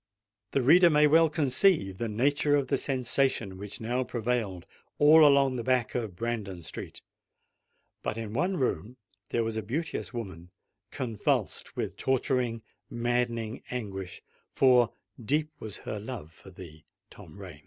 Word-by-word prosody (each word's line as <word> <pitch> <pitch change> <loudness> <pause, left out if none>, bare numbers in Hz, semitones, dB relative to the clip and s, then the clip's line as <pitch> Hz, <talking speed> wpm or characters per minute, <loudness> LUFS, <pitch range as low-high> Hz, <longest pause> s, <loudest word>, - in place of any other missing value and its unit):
The 135 - +2
reader 170 +6 +7
may 150 -1 +5
well 160 +2 +5
conceive 145 - +2
the 115 - -2
nature 145 +6 +2
of 140 -2 0
the 140 - +2
sensation 130 -6 -1
which 100 0 -7
now 120 +3 -1
prevailed 115 -7 -2 0.3
all 155 +2 +7
along 140 -3 +4
the 120 - -3
back 125 -2 +1
of 110 -7 -3
Brandon 100 -5 -4
Street;—but 105 - -10
in 110 -2 -5
one 180 +9 0
room 125 - -2 0.3
there 115 - 0
was 115 -1 -3
a - - -1
beauteous 150 - -4
woman 95 -8 -7 0.4
convulsed 115 -5 -2
with - - -3
torturing—maddening 120 -2 -2
anguish,—for 120 +3 0 0.3
deep 150 +6 0
was 110 -2 -5
her 105 - -6
love 105 -8 -7
for 95 - -16
thee, 85 -4 -12 0.3
Tom - - -14
Rain! 90 -7 -10
120 Hz, 135 wpm, -28 LUFS, 105-135 Hz, 0.4 s, reader